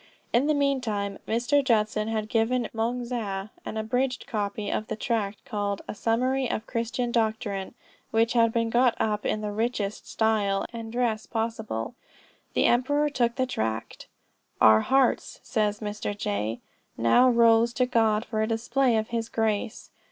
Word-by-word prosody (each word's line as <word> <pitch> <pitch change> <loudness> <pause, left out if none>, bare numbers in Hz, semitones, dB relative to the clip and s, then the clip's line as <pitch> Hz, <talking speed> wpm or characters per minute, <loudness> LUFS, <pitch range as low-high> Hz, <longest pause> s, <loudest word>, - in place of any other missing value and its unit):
In 245 +5 +3
the 305 - +3
meantime 235 -8 -1
Mr. 245 +6 +2
Judson 215 -3 +1
had 220 -1 -2
given 230 +2 +1
Moung 235 +2 -1
Zah 210 -5 -3
an 220 - -5
abridged 250 +4 -1
copy 205 -1 -3
of 215 - -2
the 220 - -3
tract 215 -3 -2
called 205 -1 -2
a - - -4
"Summary 250 +4 0
of 215 - -2
Christian 235 +1 -2
Doctrine," 220 -3 -1 0.3
which 225 +1 +2
had 230 -2 +4
been 230 0 0
got 245 0 +4
up 210 -1 0
in 215 - -1
the 210 -1 -3
richest 215 -1 -2
style 210 -3 +1
and 225 -1 -6
dress 230 -3 -1
possible. 220 - -3 0.6
The - - +3
emperor 290 +5 +2
took 240 -3 +1
the 260 - +1
tract 110 - -4 0.5
"Our 110 0 +7
hearts," 270 - +1
says 210 -2 -1
Mr. 205 -1 -4
J., 105 - -2 0.4
"now 115 - +5
rose 235 -1 +5
to 250 +2 +2
God 225 -3 +2
for 215 -1 -2
a 220 - +1
display 235 +2 +1
of 220 0 -2
his 230 -1 -2
grace. 220 +1 -2
225 Hz, 160 wpm, -26 LUFS, 210-240 Hz, 0.6 s, Our